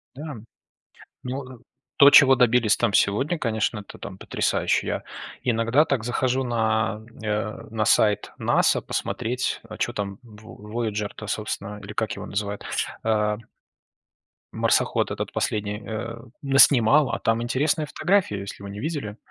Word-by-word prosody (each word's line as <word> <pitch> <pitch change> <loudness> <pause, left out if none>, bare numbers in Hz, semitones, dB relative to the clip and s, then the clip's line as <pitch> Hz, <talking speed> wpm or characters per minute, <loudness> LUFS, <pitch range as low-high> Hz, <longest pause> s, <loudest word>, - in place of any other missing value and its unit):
Да, 150 +1 -7 0.9
мне 125 0 -4
от 130 -3 -9 0.3
То, 140 0 +8
чего 135 -2 +8
добились 120 -3 +3
там 120 -3 +1
сегодня, 135 - +2
конечно, 110 -3 -1
это 100 - -12
там 95 -1 -8
потрясающе. - - 0
Я - - -2 0.4
иногда 120 +4 +3
так 135 -7 -1
захожу 130 +2 0
на, 110 -3 0 0.2
э, 105 0 -3 0.2
сайт 105 -1 +3
NASA - - +3
посмотреть, 125 +2 -2
а 110 - -8
чё 120 - -1
там 100 -3 -4
в 105 -2 -13
Вояджер-то 105 -2 -3
собственно, 105 -1 -4
или 100 +1 -8
как 110 0 -2
его - - -7
называют, 100 0 -4 0.4
э 105 -1 +1 1.2
марсоход - - +1
этот - - -4
последний, 105 0 -2
э, 115 +1 -5 0.3
наснимал, 135 0 +5
а - - -2
там 115 +1 +1
интересная 145 +5 0
фотография, 175 - +1
если 100 0 -8
вы 100 - -7
не 100 +1 -7
видели. 130 -7 -4
115 Hz, 140 wpm, -24 LUFS, 105-130 Hz, 1.2 s, То